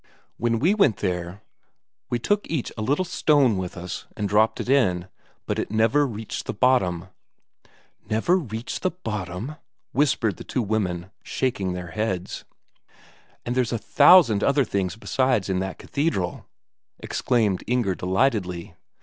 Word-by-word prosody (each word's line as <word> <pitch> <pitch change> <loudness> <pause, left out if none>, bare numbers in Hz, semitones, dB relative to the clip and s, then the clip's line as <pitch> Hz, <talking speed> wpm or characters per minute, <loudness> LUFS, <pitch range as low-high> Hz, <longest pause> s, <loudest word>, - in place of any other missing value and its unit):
When 115 0 +1
we 165 - +3
went 195 - +3
there, 90 +1 -3 0.7
we 120 - 0
took 205 - 0
each 155 -7 -2
a 110 - -5
little 145 +11 +1
stone 145 - +3
with 90 -1 -5
us, 90 0 -6
and 105 - -1
dropped 105 +3 +2
it - - -4
in, 95 -10 +2 0.4
but - - -2
it - - -2
never 115 +7 +3
reached 110 -2 -6
the - - -3
bottom." 95 -8 +2 1.0
"Never 115 +12 +2
reached 115 - -5
the 185 - +2
bottom?" 110 - -5 0.3
whispered 130 - +1
the - - -8
two 125 - -2
women, 95 -4 -2
shaking 100 -8 -2
their 90 -2 -6
heads. 95 -2 -3 1.0
"And 120 - -1
there's 125 -2 0
a 120 - 0
thousand 115 - +6
other 140 0 +3
things 100 -3 -2
besides 125 -3 0
in 95 -1 +1
that 95 0 -4
cathedral," 140 - -2 0.5
exclaimed 110 -7 0
Inger 120 -6 +1
delightedly. 95 -2 -1
110 Hz, 145 wpm, -24 LUFS, 95-130 Hz, 1.0 s, thousand